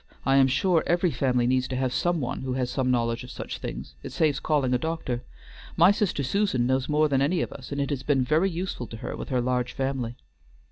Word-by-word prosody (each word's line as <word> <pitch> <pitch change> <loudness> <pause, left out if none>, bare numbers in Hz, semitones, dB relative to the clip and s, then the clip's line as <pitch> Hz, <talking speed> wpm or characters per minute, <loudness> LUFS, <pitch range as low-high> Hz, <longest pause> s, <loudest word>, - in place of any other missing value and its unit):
I 135 +1 +4
am 135 -1 +6
sure 165 +5 +2
every 175 0 +2
family 125 -2 +1
needs 130 +1 +2
to 130 - -4
have 130 -1 0
some 175 -1 +1
one 125 - -3
who 130 -1 -3
has 125 -1 -1
some 130 -2 0
knowledge 115 -1 0
of 125 - -10
such - - -6
things; 65 +3 -6
it - - -7
saves 150 -4 +1
calling 140 -5 +1
a 125 - +2
doctor. 145 -6 -3 0.6
My 175 +4 +7
sister 205 -8 0
Susan 135 -5 +1
knows 130 +2 0
more 150 +1 +3
than 135 -2 +1
any 160 +5 +2
of - - -6
us, 130 0 -10
and 140 - -2
it 140 +1 -1
has 140 -3 -2
been 135 -2 +2
very 155 +9 +2
useful 175 -8 -4
to 115 - -8
her - - -5
with - - -7
her 130 -2 +1
large 125 0 -1
family." 130 -4 -2
135 Hz, 240 wpm, -26 LUFS, 125-155 Hz, 0.6 s, My